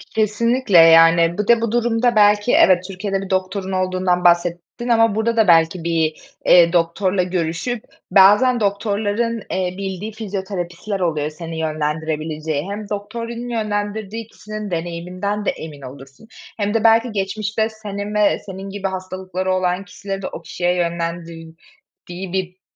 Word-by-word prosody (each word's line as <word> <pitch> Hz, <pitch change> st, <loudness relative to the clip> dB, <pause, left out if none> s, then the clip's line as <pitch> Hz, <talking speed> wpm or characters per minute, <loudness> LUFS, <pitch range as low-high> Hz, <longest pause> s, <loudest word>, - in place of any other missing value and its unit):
Kesinlikle. 220 Hz, 0 st, +2 dB
Yani, 165 Hz, +1 st, +6 dB
bir 210 Hz, 0 st, -2 dB
de 235 Hz, -1 st, +5 dB
bu 230 Hz, -2 st, -1 dB
durumda 240 Hz, 0 st, +1 dB
belki 210 Hz, +2 st, +4 dB
evet, 180 Hz, -1 st, +5 dB
Türkiye'de 195 Hz, 0 st, -3 dB
bir 195 Hz, -, -7 dB
doktorun 190 Hz, +1 st, -2 dB
olduğundan 185 Hz, -1 st, 0 dB
bahsettin 175 Hz, +7 st, +1 dB
ama 225 Hz, -2 st, +4 dB
burada 230 Hz, +1 st, 0 dB
da 220 Hz, -2 st, +4 dB
belki 165 Hz, 0 st, +4 dB
bir, 165 Hz, -2 st, 0 dB, 0.3 s
eee, 170 Hz, -1 st, +6 dB
doktorla 180 Hz, +2 st, +1 dB
görüşüp, 180 Hz, +6 st, -2 dB, 0.3 s
bazen 210 Hz, +6 st, +6 dB
doktorların, 210 Hz, +2 st, -1 dB
eee, 185 Hz, -1 st, -1 dB
bildiği 195 Hz, +2 st, -5 dB
fizyoterapistler 195 Hz, -2 st, -5 dB
oluyor 155 Hz, -4 st, -1 dB
seni 165 Hz, +1 st, -7 dB
yönlendirebileceği. 155 Hz, -1 st, -2 dB
Hem 205 Hz, 0 st, -6 dB
doktorun 230 Hz, +4 st, -5 dB
yönlendirdiği 215 Hz, -1 st, -3 dB
kişinin 215 Hz, -2 st, -8 dB
deneyiminden 180 Hz, +5 st, -3 dB
de -, -, +2 dB
emin 150 Hz, -3 st, -9 dB
olursun 135 Hz, -, -12 dB, 0.3 s
hem 205 Hz, -1 st, -1 dB
de 225 Hz, -, 0 dB
belki 225 Hz, +1 st, +4 dB
geçmişte 215 Hz, +2 st, -2 dB
senin 210 Hz, -1 st, -6 dB
ve 210 Hz, -1 st, +3 dB
senin 195 Hz, 0 st, -7 dB
gibi 195 Hz, 0 st, -3 dB
hastalıkları 185 Hz, 0 st, -4 dB
olan 185 Hz, +1 st, -1 dB
kişileri 195 Hz, +1 st, -6 dB
de 185 Hz, -, -4 dB
o -, -, -8 dB
kişiye 175 Hz, +2 st, -1 dB
yönlendirdiği 170 Hz, +1 st, -6 dB
bir 185 Hz, -1 st, -3 dB
190 Hz, 140 wpm, -20 LUFS, 170-210 Hz, 0.3 s, Yani